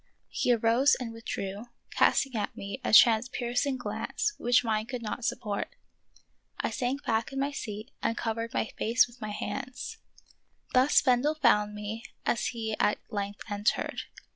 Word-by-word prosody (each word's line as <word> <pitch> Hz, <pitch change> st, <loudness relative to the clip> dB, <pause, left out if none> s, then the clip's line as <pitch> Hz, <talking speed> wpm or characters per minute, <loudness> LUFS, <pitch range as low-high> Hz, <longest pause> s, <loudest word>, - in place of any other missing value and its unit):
He -, -, +1 dB
arose 235 Hz, +4 st, +4 dB
and 235 Hz, -3 st, -5 dB
withdrew, 205 Hz, -2 st, -5 dB, 0.3 s
casting 270 Hz, -1 st, +3 dB
at 210 Hz, -, -2 dB
me 200 Hz, +7 st, -6 dB
a -, -, -1 dB
transpiercing 245 Hz, +4 st, +4 dB
glance 420 Hz, +10 st, -2 dB
which 245 Hz, +1 st, +4 dB
mine 220 Hz, -1 st, 0 dB
could 245 Hz, -1 st, -5 dB
not 225 Hz, +3 st, -4 dB
support. 210 Hz, -3 st, -2 dB, 0.8 s
I -, -, -1 dB
sank 260 Hz, +3 st, -2 dB
back 225 Hz, +3 st, 0 dB
in 270 Hz, -, -3 dB
my 280 Hz, +1 st, 0 dB
seat 220 Hz, -2 st, -6 dB
and 230 Hz, -, 0 dB
covered 230 Hz, 0 st, -2 dB
my -, -, -1 dB
face 235 Hz, +3 st, +4 dB
with 240 Hz, 0 st, -18 dB
my 215 Hz, -, -4 dB
hands. 255 Hz, +4 st, -5 dB, 0.7 s
Thus 255 Hz, +3 st, +5 dB
Bendel 265 Hz, +4 st, +3 dB
found 210 Hz, -7 st, +3 dB
me 210 Hz, +2 st, -5 dB, 0.2 s
as 235 Hz, -, +1 dB
he 220 Hz, -2 st, -3 dB
at 210 Hz, -, +3 dB
length 200 Hz, -1 st, -4 dB
entered. 205 Hz, +1 st, 0 dB
230 Hz, 155 wpm, -29 LUFS, 215-255 Hz, 0.8 s, Thus